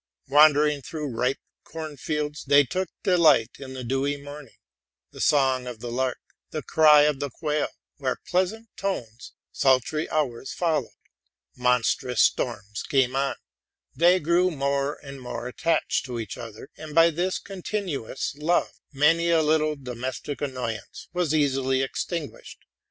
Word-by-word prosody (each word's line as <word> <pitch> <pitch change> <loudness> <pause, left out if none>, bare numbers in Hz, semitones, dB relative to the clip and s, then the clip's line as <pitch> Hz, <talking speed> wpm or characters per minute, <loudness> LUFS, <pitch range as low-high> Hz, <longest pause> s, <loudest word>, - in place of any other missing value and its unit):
Wandering 150 0 +5
through 150 -3 -5
ripe 125 +3 +1 0.3
cornfields, 150 -1 -4
they 145 0 +6
took 185 +5 -2
delight 165 - +4
in 130 -1 -8
the 130 - -6
dewy 135 +4 -1
morn 145 0 -10
ing; - - -24 0.6
the - - -9
song 130 -3 +2
of 120 -3 -7
the 120 +1 -6
lark, 130 +1 -1 0.3
the 155 - -5
ery 150 -2 +7
of 150 -2 +1
the 145 -1 -2
quail, 150 +2 -1 0.3
were 130 -2 -1
pleas 185 +1 +1
unt 225 +1 -12
tones; 120 - -5 0.2
sultry 135 +3 +1
hours 135 -5 -2
followed, 165 -3 -1 0.6
monstrous 125 0 +1
storms 105 -4 +1
came 130 -2 +1
on, 140 0 0 0.3
— - - -47
they 180 +2 +6
grew 175 +3 +2
more 140 -2 -1
and 140 -1 -9
more 125 -1 -5
attached 160 +5 0
to 125 -3 -5
each 110 -4 -5
other, 115 +2 -9
and 155 -1 -9
by 165 0 +6
this 180 +4 -1
continuous 185 - -4
love 155 +5 +1 0.2
many 165 +4 +3
a 165 -2 +4
little 155 0 +2
domestic 130 +2 -5
annoyance 125 -7 -5
was 175 -4 0
easily 135 -2 +1
extinguished. 155 +3 -5
145 Hz, 145 wpm, -25 LUFS, 130-155 Hz, 0.6 s, ery